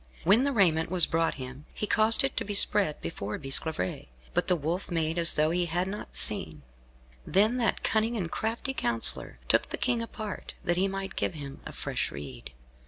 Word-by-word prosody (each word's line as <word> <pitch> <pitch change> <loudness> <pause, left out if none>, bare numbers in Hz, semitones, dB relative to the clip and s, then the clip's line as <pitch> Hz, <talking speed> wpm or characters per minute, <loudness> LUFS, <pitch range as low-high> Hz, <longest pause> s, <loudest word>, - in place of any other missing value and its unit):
When 215 +9 +4
the 280 - +1
raiment 170 - +2
was 180 -2 +5
brought 165 0 0
him, 130 +2 -9
he - - -2
caused 220 +3 +4
it 270 - -2
to - - +1
be 205 0 -3
spread 195 -5 +4
before 100 +5 -5
Bisclavaret, 135 - -1 0.3
but - - 0
the 180 - +3
Wolf 170 +4 -3
made 165 -1 -1
as 170 0 +4
though 155 +1 +2
he 175 0 0
had 175 +3 -1
not 205 +2 -5
seen. 75 -2 +3 0.6
Then 215 - +2
that 235 -2 -1
cunning 225 +2 0
and 170 -5 -4
crafty 230 +5 -2
counsellor 115 - 0
took - - +2
the - - -4
King 240 -2 0
apart, 215 -3 -7
that 175 - 0
he 190 +2 +2
might 195 0 -5
give 175 - -2
him 140 -2 -8
a - - -8
fresh - - -3
rede. 65 -4 -9
175 Hz, 195 wpm, -28 LUFS, 150-210 Hz, 0.6 s, was